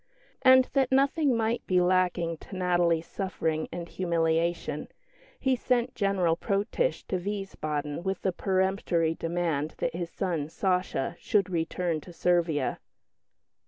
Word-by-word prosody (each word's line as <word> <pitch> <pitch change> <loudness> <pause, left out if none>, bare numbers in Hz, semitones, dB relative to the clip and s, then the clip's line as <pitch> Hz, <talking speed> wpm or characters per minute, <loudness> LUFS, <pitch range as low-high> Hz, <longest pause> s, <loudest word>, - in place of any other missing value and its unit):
And 260 -1 +7
that 265 -2 +2
nothing 275 -1 +3
might 225 +1 0
be 180 -1 +3
lacking 180 -2 +1
to - - -10
Natalie's 175 -2 +2
suffering 160 -5 -2
and 170 -1 -5
humiliation, 170 -1 0 0.5
he 265 -1 +2
sent 250 0 0
General 190 -5 +1
Protitsch 205 - -1
to 185 - -2
Wiesbaden 160 -7 -3
with 190 +2 -3
a 190 - +3
peremptory 185 -3 +1
demand 165 -3 -2
that - - -1
his 170 0 -4
son, 170 -7 -2
"Sacha," 180 -6 -1
should 195 -3 +1
return 165 -1 -1
to 175 - -12
Servia. 170 -3 +1
180 Hz, 125 wpm, -28 LUFS, 165-200 Hz, 0.5 s, And